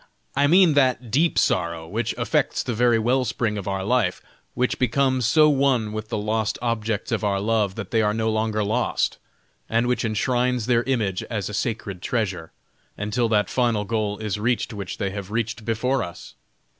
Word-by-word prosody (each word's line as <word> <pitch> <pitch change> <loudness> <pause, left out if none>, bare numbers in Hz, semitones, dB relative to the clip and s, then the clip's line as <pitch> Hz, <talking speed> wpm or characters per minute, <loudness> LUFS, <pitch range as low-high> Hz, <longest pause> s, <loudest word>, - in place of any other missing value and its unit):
I 140 +1 +3
mean 175 0 +6
that 130 -4 +2
deep 160 +7 +2
sorrow 85 -2 +1
which 110 +5 -2
affects 115 -2 0
the 125 - -2
very 120 +1 +3
well 125 +4 +2
spring 115 -3 -1
of 100 -2 -5
our 95 -1 -2
life, 110 -4 +1 0.4
which 125 0 0
becomes 130 -1 +2
so 155 +6 +5
one 135 -6 +2
with 110 0 -5
the 115 - -2
lost 110 +1 -1
objects 115 -1 -2
of 115 -1 -1
our 100 -1 +1
love 105 -2 0
that 105 -5 -6
they 115 - +3
are 105 -1 +2
no 110 +1 0
longer 110 -1 0
lost, 110 +4 0 0.5
and 115 +1 +2
which 125 -1 0
enshrines 120 +2 0
their 120 -1 +3
image 110 -8 0
as 105 -4 -3
a - - -7
sacred 100 -4 -3
treasure, 95 -9 -2 0.5
until 110 +3 0
that 105 -2 +2
final 115 -5 0
goal 105 -1 -1
is 105 -1 -3
reached 120 +1 0
which 100 -3 -6
they 100 -3 -2
have 100 -1 -6
reached 115 0 -3
before 125 +4 0
us! 85 - -8
110 Hz, 185 wpm, -23 LUFS, 105-125 Hz, 0.5 s, mean